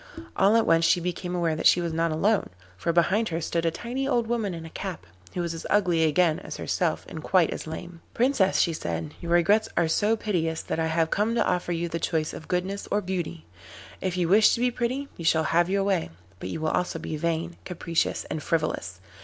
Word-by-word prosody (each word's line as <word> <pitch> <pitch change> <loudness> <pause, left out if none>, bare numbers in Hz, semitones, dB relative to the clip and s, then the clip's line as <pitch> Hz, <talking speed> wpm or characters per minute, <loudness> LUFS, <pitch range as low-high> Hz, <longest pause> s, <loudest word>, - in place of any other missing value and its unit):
All 200 +3 +4
at 230 - +4
once 165 0 +4
she 170 - +4
became 180 +1 -3
aware 170 -3 +1
that 155 - +3
she - - +5
was 170 -2 -2
not 165 +1 +1
alone, 200 +7 +1 0.3
for 170 - -1
behind 190 +6 +2
her 165 -1 -2
stood 165 0 -1
a - - +5
tiny 245 +10 -4
old 235 -1 +1
woman 225 -5 -1
in 165 -1 -7
a - - -8
cap, 185 - -6 0.3
who 180 - -1
was 170 -1 -2
as 165 - -7
ugly 180 -5 +3
again 160 +1 +3
as - - -7
herself - - -1
and 160 - -7
quite 180 0 +3
as - - -5
lame. 170 +1 -7
'Princess,' 240 -6 +2
she 170 - +3
said, 80 - -4
'your 170 - -4
regrets 200 +6 +4
are 170 -1 +3
so 210 +7 +2
piteous 165 -7 -1
that - - -3
I 160 - +1
have 160 0 +1
come 215 +3 +1
to - - +2
offer 180 -1 0
you 170 0 -1
the 165 0 -3
choice 155 -1 -1
of 160 - -9
goodness 190 +2 -2
or 205 - +2
beauty. 180 - -4 0.6
If 185 -1 -2
you 175 -2 +1
wish 210 +4 +6
to - - -5
be 250 +1 +2
pretty 255 +4 -2
you 170 - -7
shall 160 0 +3
have 170 +3 +2
your 195 0 +1
way, 195 -4 0 0.3
but 90 - -5
you 155 - -4
will 155 - +1
also 180 0 -1
be 160 - -5
vain, 170 +2 -2
capricious, 170 -2 -1
and 155 - -4
frivolous. 95 - -2
170 Hz, 230 wpm, -26 LUFS, 165-200 Hz, 0.6 s, wish